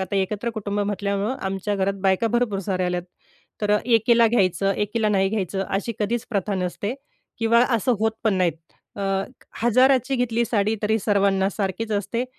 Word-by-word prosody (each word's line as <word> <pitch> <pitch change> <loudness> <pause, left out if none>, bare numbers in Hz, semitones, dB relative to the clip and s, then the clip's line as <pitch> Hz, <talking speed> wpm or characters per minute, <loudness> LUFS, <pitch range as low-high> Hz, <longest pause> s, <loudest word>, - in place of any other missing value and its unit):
आता 190 +1 -2
एकत्र 205 +4 -1
कुटुंब 205 -2 -3
म्हटल्यामुळं 200 +3 -1
आमच्या 195 +2 -2
घरात 195 0 0
बायका 190 +3 +2
भरपूर 240 -3 0
साऱ्या 185 -1 -1
आल्यात. 180 -1 -1 0.6
तर 210 0 0
एकीला 230 0 +4
घ्यायचं, 195 -3 +2
एकीला 215 +1 0
नाही 195 -2 +2
घ्यायचं 195 -2 -2
अशी 205 +4 -2
कधीच 220 +2 -1
प्रथा 200 -1 -1
नसते. 190 +4 -3 0.4
किंवा 230 +1 +4
असं 245 +3 +1
होत 220 0 +2
पण 215 -3 +3
नाहीत. 180 -3 +2 0.4
अ, 200 - -4 0.6
1000 255 +3 +5
ची 270 0 -1
घेतली 235 -1 +1
साडी 215 -1 +1
तरी 220 +1 +2
सर्वांना 195 -2 +2
सारखीच 205 +2 -3
असते 230 +4 -1
205 Hz, 165 wpm, -23 LUFS, 195-230 Hz, 0.6 s, 1000